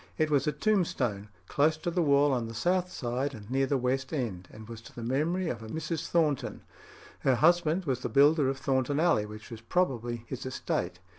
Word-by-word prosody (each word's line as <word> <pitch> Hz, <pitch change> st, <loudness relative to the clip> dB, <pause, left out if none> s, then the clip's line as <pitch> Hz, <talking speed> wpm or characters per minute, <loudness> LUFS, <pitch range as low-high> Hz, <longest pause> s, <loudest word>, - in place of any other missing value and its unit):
It 155 Hz, -1 st, +1 dB
was 140 Hz, 0 st, +2 dB
a -, -, +3 dB
tombstone, 140 Hz, -, 0 dB, 0.2 s
"close 155 Hz, +2 st, +2 dB
to 170 Hz, +2 st, -3 dB
the 175 Hz, +1 st, +1 dB
wall 145 Hz, -2 st, +4 dB
on 120 Hz, -3 st, -1 dB
the 115 Hz, -, -8 dB
south 180 Hz, -, 0 dB
side, 130 Hz, +3 st, -2 dB
and 105 Hz, -2 st, -11 dB
near 135 Hz, +1 st, +2 dB
the 140 Hz, -, +1 dB
west 130 Hz, +1 st, -1 dB
end," 110 Hz, -, -3 dB
and 110 Hz, 0 st, -11 dB
was 115 Hz, -1 st, -9 dB
to -, -, -15 dB
the 120 Hz, -, -6 dB
memory 155 Hz, +9 st, 0 dB
of 120 Hz, -7 st, -3 dB
a 110 Hz, -, -8 dB
Mrs. 160 Hz, +5 st, -3 dB
Thornton. 155 Hz, -5 st, 0 dB, 0.6 s
Her 135 Hz, -2 st, +2 dB
husband 170 Hz, +4 st, +3 dB
was 130 Hz, -4 st, -1 dB
the -, -, -4 dB
builder 145 Hz, 0 st, +4 dB
of 135 Hz, -, -2 dB
Thornton 135 Hz, +1 st, 0 dB
Alley, 160 Hz, -11 st, +2 dB
which 105 Hz, +2 st, -11 dB
was 115 Hz, -1 st, -8 dB
probably 120 Hz, -6 st, -1 dB
his 130 Hz, 0 st, -6 dB
estate. 130 Hz, -7 st, -3 dB
135 Hz, 210 wpm, -29 LUFS, 120-160 Hz, 0.6 s, wall